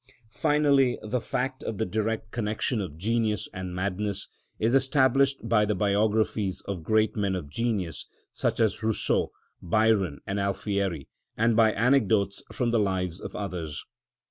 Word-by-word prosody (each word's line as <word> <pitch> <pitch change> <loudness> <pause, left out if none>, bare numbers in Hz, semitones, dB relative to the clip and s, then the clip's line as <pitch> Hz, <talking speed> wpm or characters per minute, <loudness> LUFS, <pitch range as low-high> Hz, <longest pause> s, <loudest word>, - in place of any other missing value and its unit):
Finally, 140 -1 +3
the 110 +4 -1
fact 130 +4 -3
of 110 - -4
the 110 - 0
direct 110 +2 -2
connection 110 +1 -1
of 80 -6 -6
genius 110 +1 0
and 90 -1 -5
madness 100 +2 -2 0.3
is 115 +3 +1
established 135 -1 +3
by 110 -2 +4
the 105 0 0
biographies 105 -1 +1
of 100 -4 -3
great 110 +5 +2
men 100 -2 0
of 85 -6 -5
genius, 95 -3 -2 0.3
such - - -1
as 110 -3 +2
Rousseau, 110 -1 +1 0.3
Byron, 100 -4 +2
and 100 +1 -2
Alfieri, 100 -5 -1 0.3
and 115 0 +3
by 110 -1 +5
anecdotes 110 -4 +2
from 120 -2 0
the 115 - +3
lives 95 -3 -1
of - - -7
others. 85 -7 -5
105 Hz, 145 wpm, -27 LUFS, 95-115 Hz, 0.3 s, by